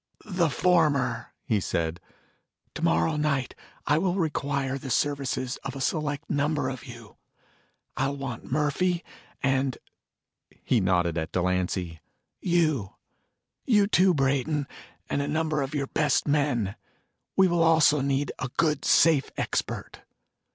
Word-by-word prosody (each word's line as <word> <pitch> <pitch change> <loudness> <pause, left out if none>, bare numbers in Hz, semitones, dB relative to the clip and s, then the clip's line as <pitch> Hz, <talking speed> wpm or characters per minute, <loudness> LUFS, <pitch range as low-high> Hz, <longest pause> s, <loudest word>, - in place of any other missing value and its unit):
"The 180 -6 +1
former," 145 -6 +1
he 110 - +1
said. 85 -2 -2 0.7
"Tomorrow 85 - +1
night 140 -4 0 0.3
I 150 +3 +3
will 180 0 0
require 140 -5 -1
the 135 - -7
services 130 -1 -1
of 135 -1 -7
a - - -5
select 145 +1 -2
number 145 -1 0
of 130 0 -7
you. 120 -4 -12 0.8
I'll 135 +1 -1
want 130 -5 -6
Murphy, 155 +5 +1 0.4
and 135 -1 +1 0.4
" - - -34
he 125 - +3
nodded 90 -3 +1
at 80 +1 -4
Delancy 90 -2 -1 0.4
"you. 155 - +1 0.7
You, 210 -5 +5
too, 185 -3 +4
Brayton, 140 +1 0 0.4
and 140 - -1
a 140 - -2
number 155 0 0
of 135 +2 -3
your 140 -1 0
best 150 +1 +1
men. 140 -9 +1 0.6
We 190 -1 +6
will 175 -1 +1
also 160 -3 +5
need 140 0 0
a 135 - -3
good 150 -4 +1
safe 155 -4 +4
expert." - - -3
140 Hz, 130 wpm, -27 LUFS, 125-155 Hz, 0.8 s, We